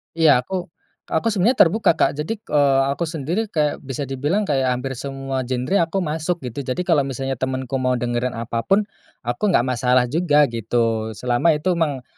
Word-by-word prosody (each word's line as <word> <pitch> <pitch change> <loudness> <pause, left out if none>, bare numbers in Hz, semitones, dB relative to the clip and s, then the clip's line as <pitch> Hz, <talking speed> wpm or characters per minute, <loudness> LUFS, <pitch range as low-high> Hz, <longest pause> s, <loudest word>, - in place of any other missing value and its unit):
Iya 155 -6 +5
aku 180 +1 -4 0.4
aku 160 +7 0
sebenarnya 215 +6 +2
terbuka 185 -2 +4
Kak, - - +2
jadi, 160 +10 -2
eee, 140 -9 +2
aku 170 +4 -2
sendiri 165 +8 -2
kayak 150 -6 0
bisa 135 0 -5
dibilang 145 +10 -1
kayak 135 -7 +1
hampir 130 +2 -4
semua 135 -1 -4
genre 130 +9 0
aku 190 +2 -1
masuk 160 0 -2
gitu. 125 +2 -5
Jadi 130 +8 -1
kalau 165 -5 +3
misalnya 135 -1 -4
temanku 130 0 -2
mau 130 0 +1
dengerin 120 +1 -2
apapun, 115 - 0 0.4
aku 120 - -1
enggak 120 - +3
masalah 125 0 +2
juga 150 -3 +3
gitu. 115 -1 -1
Selama 125 +8 +2
itu 170 +5 0
emang 145 -6 -1
135 Hz, 175 wpm, -21 LUFS, 125-165 Hz, 0.4 s, Iya